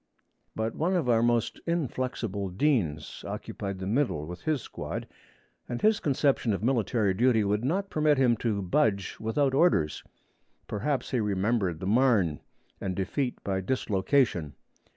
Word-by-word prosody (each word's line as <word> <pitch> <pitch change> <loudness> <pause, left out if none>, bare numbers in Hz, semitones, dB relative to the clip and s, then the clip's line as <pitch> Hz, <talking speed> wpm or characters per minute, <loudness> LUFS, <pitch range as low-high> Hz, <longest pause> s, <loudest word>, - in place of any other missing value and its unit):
But 110 +1 -1
one 175 +5 0
of 165 -8 0
our 115 -2 +4
most 120 -1 +1
inflexible 125 - -2
deans 90 - 0
occupied 100 -1 -5
the 95 - -5
middle 105 - 0
with 90 +3 -8
his 155 -3 +1
squad, - - -6 0.6
and 120 -1 -3
his 215 0 +3
conception 135 -5 +1
of 100 - -3
military 115 -4 +1
duty 115 +1 +3
would 105 +2 0
not 190 +9 -1
permit 150 -2 +3
him 125 -3 +4
to 105 -3 -1
budge 100 -1 0
without 130 +5 +1
orders. 135 - +2 0.6
Perhaps 135 +7 -2
he 125 - +1
remembered 100 -3 0
the 95 - -5
Marne 105 - +3 0.4
and 95 -1 -3
defeat 125 +8 -2
by 95 -1 -1
dislocation. 100 - +1
115 Hz, 145 wpm, -28 LUFS, 95-135 Hz, 0.6 s, our